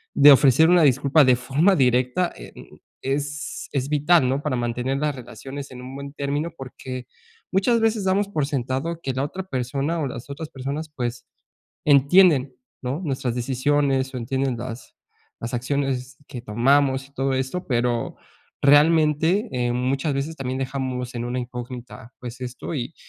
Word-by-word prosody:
de 145 +1 +9
ofrecer 140 +4 +5
una 175 -2 +5
disculpa 140 +2 +4
de 130 -1 +5
forma 145 +10 +2
directa, 125 +5 +2
eh, - - -10
mm, - - -14 0.3
es 145 +2 -3
es 135 -1 -1
vital, 150 0 +4
¿no?, 135 +2 0
para 145 -4 -1
mantener 120 +3 -1
las 150 -2 -1
relaciones 135 +2 -8
en 125 0 -9
un 130 +2 -9
buen 140 0 -7
término 145 +3 -2
porque 130 -1 -7 0.4
muchas 200 +5 +3
veces 220 -2 +1
damos 195 +2 +2
por 150 -8 0
sentado 140 +5 -2
que 135 - -2
la 130 +2 -1
otra 185 +6 -4
persona 140 +2 -2
o 140 - -1
las 120 +1 -8
otras 150 +2 -6
personas, 140 +4 -5
pues, 120 -1 -4 0.6
entienden, 145 0 +5 0.3
¿no?, 130 +6 -3
nuestras 130 -5 -2
decisiones 135 +1 0
o 125 - -2
entienden 130 +1 -1
las 120 0 -8 0.5
las 115 +2 -4
acciones 130 0 -2
que 125 -4 -7
tomamos 135 +4 +2
y - - -30
todo 135 0 0
esto, 130 +8 -3
pero 120 -2 0 0.5
realmente, 160 - +4
em, 120 -1 0
muchas 135 +4 0
veces 140 +4 -2
también 130 -1 -3
dejamos 130 -2 -3
en 120 0 -3
una 125 +1 -2
incógnita, 125 -1 -8
pues, 125 +1 -8
esto 125 +6 -6
y 130 +3 -4
135 Hz, 165 wpm, -23 LUFS, 125-150 Hz, 0.6 s, de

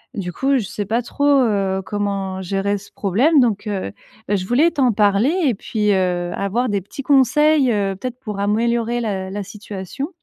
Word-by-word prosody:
du 180 -3 -4
coup, 275 +5 +1
je 230 - -2
sais 205 - -4
pas 225 +4 0
trop, 285 +4 -3
heu, 205 -9 +2
comment 195 0 -3
gérer 195 +2 -1
ce 200 - -14
problème. 250 - +2
Donc 225 -4 +1
heu, 195 - -3 0.4
bah, 205 - +1
je 185 -2 -2
voulais 275 - +3
t'en 260 -6 +2
parler 205 +7 +3
et 260 - +3
puis, 210 +1 -1
heu, 180 -2 0
avoir 230 +6 -1
des 200 -1 0
petits 205 +9 -9
conseils, 285 +1 +4
heu, 200 -3 0
peut-être 250 +5 -6
pour 210 -6 -6
améliorer 230 +3 0
la 195 -4 -3
la 205 +1 -4
situation. 205 - -7
210 Hz, 190 wpm, -20 LUFS, 195-250 Hz, 0.4 s, conseils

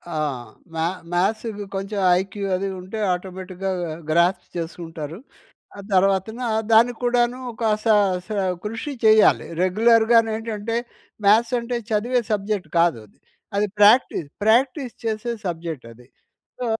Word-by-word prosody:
ఆ! - - -1 0.6
మ్యా 165 +1 0 0.3
మ్యాథ్స్‌కి 210 +3 -1
కొంచెం 195 +1 -3 0.2
ఐక్యూ 195 +1 -5
అది 195 +2 -2
ఉంటే, 185 +4 -7 0.2
ఆటోమేటిక్‌గా 185 +1 -5 0.4
గ్రాస్ప్ 170 +4 +2
చేసుకుంటారు. 165 -2 -6 0.6
ఆ - - -6
తర్వాతన 195 +4 +2 0.3
దానికి 235 +2 +5
కూడాను 245 0 +2
ఒక, 230 - -10 0.2
సా 225 -2 +5 0.3
సా 215 - -3 0.3
కృషి 225 +8 -4
చేయాలి. 215 0 +5 0.2
రెగ్యులర్‌గా‌ను 225 +3 +4
ఏంటంటే, 225 0 -4 0.5
మ్యాథ్స్ 225 +4 +4
అంటే 240 +1 -3
చదివే 235 +4 +1
సబ్జెక్ట్ 200 -4 -2
కాదది. 115 -12 0 0.6
ప్రాక్టీస్, 205 - +5 0.2
ప్రాక్టీస్ 250 +3 +2
చేసే 225 +1 -2
సబ్జెక్టది. 150 -9 -6 0.5
సో, 250 - -2
210 Hz, 110 wpm, -22 LUFS, 180-230 Hz, 0.6 s, దానికి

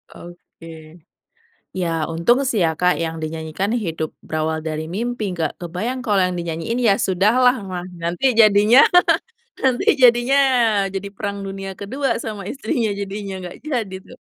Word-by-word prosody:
Oke. 165 -2 -13 0.7
Ya 185 -2 -1 0.2
untung 170 +11 +2
sih 220 -8 +1
ya 160 - +2
Kak 180 0 +3
yang 165 0 -3
dinyanyikan 160 +5 -3
Hidup 165 -8 -3
Berawal 155 0 -2
Dari 155 0 -4
Mimpi 240 +1 -3
nggak 160 -3 -3
kebayang 185 +10 -4
kalo 205 -4 +2
yang 180 0 -1
dinyanyiin 170 +7 -3
Ya 200 - +6
Sudahlah 220 +7 +3
mah 180 -1 -4 0.2
nanti 170 +8 -2
jadinya, 215 +2 +6 0.8
nanti 260 -2 +1 0.2
jadinya 240 +2 +5 0.6
jadi 195 +1 -4
perang 200 0 -4
dunia 195 0 -6
kedua 265 +7 -2
sama 210 -3 -5
istrinya 240 -4 -1
jadinya, 200 0 -5
nggak 175 - -8
jadi 240 -10 -3
tuh. 250 - -14
195 Hz, 140 wpm, -20 LUFS, 165-230 Hz, 0.8 s, Ya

